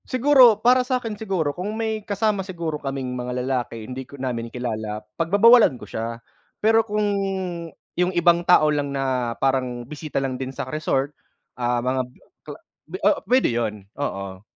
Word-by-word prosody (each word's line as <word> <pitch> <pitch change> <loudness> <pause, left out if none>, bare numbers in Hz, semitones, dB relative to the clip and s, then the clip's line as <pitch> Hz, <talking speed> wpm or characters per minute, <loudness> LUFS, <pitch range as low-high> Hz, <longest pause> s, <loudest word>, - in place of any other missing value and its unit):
Siguro 255 -3 +6
para 250 +2 +4
sa'kin 250 -3 -2
siguro 190 -9 -2
kung 205 +6 -4
may 220 -1 -2
kasama 205 0 0
siguro 170 -5 -4
kaming 135 -2 -4
mga 125 0 -4
lalaki, 120 -4 -3
hindi 130 +3 -6
ko 140 - -11
namin 120 -3 -3
kilala, 110 -3 -4
pagbabawalan 205 - +5
ko - - -10
siya. 115 +1 -4 0.4
Pero 225 +1 +4
kung 210 -1 -1 0.9
yung 180 +1 +2
ibang 170 0 +4
tao 155 -3 +4
lang 145 -1 -1
na 130 -3 -1
parang 130 -3 -1
bisita 150 +3 -6
lang 135 -1 -2
din 130 - -3
sa 130 - -5
resort, 145 -2 -1 0.4
ah, 120 -1 -1
mga 130 +1 +1 0.4
kla - - -9 0.5
o 205 - +3
pwede 255 +1 +4
yun, 105 -4 -2 0.2
oo. 100 -7 -4
145 Hz, 155 wpm, -23 LUFS, 125-205 Hz, 0.9 s, Siguro